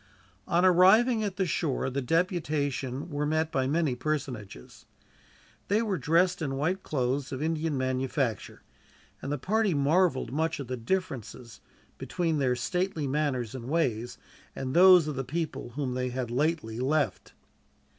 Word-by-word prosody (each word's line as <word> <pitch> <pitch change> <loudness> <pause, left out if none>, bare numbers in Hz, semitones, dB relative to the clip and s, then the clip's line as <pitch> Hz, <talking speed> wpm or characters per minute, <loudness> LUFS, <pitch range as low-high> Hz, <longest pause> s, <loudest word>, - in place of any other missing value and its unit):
On 175 +2 +3
arriving 215 +6 +5
at 200 -3 -3
the 190 - 0
shore, 150 -5 -1
the 140 +2 -2
deputation 150 -3 -1
were 145 0 -1
met 155 +1 0
by 130 -1 0
many 155 -1 +1
personages. 125 - -5 0.8
They 210 +3 +2
were 200 -5 -1
dressed 175 +3 +2
in 135 -4 -2
white 170 +7 -1
cloths 135 -2 -2
of 130 - -4
Indian 160 -2 -1
manufacture, 130 -3 -2 0.6
and 140 - -4
the 145 - 0
party 205 +4 +1
marveled 145 -3 +2
much 160 +2 -1
at 140 - -5
the 130 - -2
difference 120 - -4 0.4
between 165 -4 -1
their 130 -2 +2
stately 160 +6 -2
manners 135 -5 -1
and 125 -3 -7
ways, 125 -7 -1 0.4
and 130 -1 -4
those 180 -2 +7
of 150 - -3
the 135 - -2
people 155 -1 -4
whom 135 -3 -2
they 125 0 -2
had 125 -1 -4
lately 140 -4 -1
left. 145 +3 -1
145 Hz, 150 wpm, -28 LUFS, 130-170 Hz, 0.8 s, those